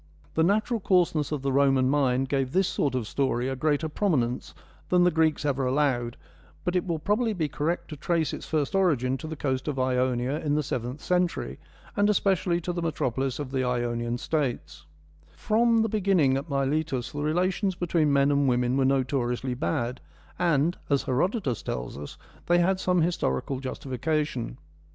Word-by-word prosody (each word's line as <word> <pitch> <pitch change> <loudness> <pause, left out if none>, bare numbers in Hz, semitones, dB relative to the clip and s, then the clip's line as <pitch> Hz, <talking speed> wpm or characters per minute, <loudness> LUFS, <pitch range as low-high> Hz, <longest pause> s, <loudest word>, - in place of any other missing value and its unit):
The 160 - +1
natural 215 +7 +2
coarseness 175 -7 +2
of 145 -3 -3
the 135 - 0
Roman 135 -1 +4
mind 135 -2 +2
gave 135 -1 -1
this 190 0 +3
sort 140 -7 0
of 125 -3 -1
story 130 -1 0
a 135 - -2
greater 150 +3 0
prominence 145 - -1 0.3
than 180 -1 +4
the 180 - +4
Greeks 160 -2 +1
ever 140 -2 0
allowed, 125 -3 0 0.5
but 180 - -1
it 180 - 0
will 170 -2 0
probably 215 +8 0
be 165 -6 -1
correct 150 +5 -2
to 155 - -6
trace 160 +2 0
its - - -6
first 150 -3 -1
origin 145 -10 +2
to 155 - -6
the 160 - -5
coast 130 -2 -2
of 145 -3 -2
Ionia 130 +1 0
in 150 -2 0
the 150 - +1
seventh 125 +2 -4
century 180 -1 -1 0.4
and 205 -1 +3
especially 190 -4 +2
to 175 +2 -3
the 170 - -3
metropolis 135 -5 -1
of 145 -3 -5
the 130 -1 0
Ionian 120 -1 -1
Statesa 120 - -3 0.5
From 230 +1 +3
the - - +1
beginning 195 -10 +2
at 140 +4 -3
Miletus 140 -1 -1
the 145 - -4
relations 185 +5 0
between 170 -4 +1
men 140 0 +4
and 140 -1 +3
women 125 +1 +1
were 135 - +3
notoriously 130 -1 0
bad, 120 +4 -2 0.4
and, 170 -1 +2
as 140 -2 +2
Herodotus 140 - 0
tells - - -4
us, 70 +1 -8 0.3
they 175 - +4
had 185 +2 +2
some 180 -2 +2
historical 135 - -1
justification. 130 -1 -3
145 Hz, 175 wpm, -27 LUFS, 130-175 Hz, 0.5 s, Roman